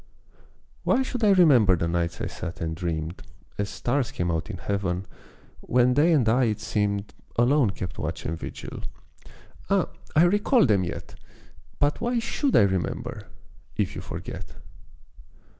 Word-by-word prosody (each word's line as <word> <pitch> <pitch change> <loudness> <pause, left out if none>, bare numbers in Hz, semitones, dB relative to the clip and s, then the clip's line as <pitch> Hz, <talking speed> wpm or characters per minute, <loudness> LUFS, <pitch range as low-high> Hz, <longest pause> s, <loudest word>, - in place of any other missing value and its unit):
Why 265 - +3
should 250 -3 -4
I 210 - +6
remember 140 - +6
the 85 0 -1
nights 85 0 -1
I - - -1
sat 85 -1 -6
and 80 -2 -2
dreamed 80 0 -3 0.4
As 100 -1 -1
stars 125 +1 -1
came 90 -1 -1
out 80 +3 -2
in 105 - -5
Heaven 95 0 -2 0.5
when 125 +1 +3
they 150 +6 +4
and 140 -8 +3
I 125 +3 +4
it 110 -2 -1
seemed, 100 -1 -1 0.2
Alone 125 0 +4
kept 95 -1 -6
watch - - -4
and 80 - -2
vigil - - -7 0.9
ah, - - +2 0.3
I 155 - +7
recall 205 +7 +4
them 105 -6 +3
yet! 85 - -6 0.6
But 145 0 +1
why 240 +1 0
should 245 +4 0
I - - +7
remember 95 -3 -2 0.5
if - - 0
you - - -6
forget! - - -7
105 Hz, 155 wpm, -26 LUFS, 90-145 Hz, 0.9 s, I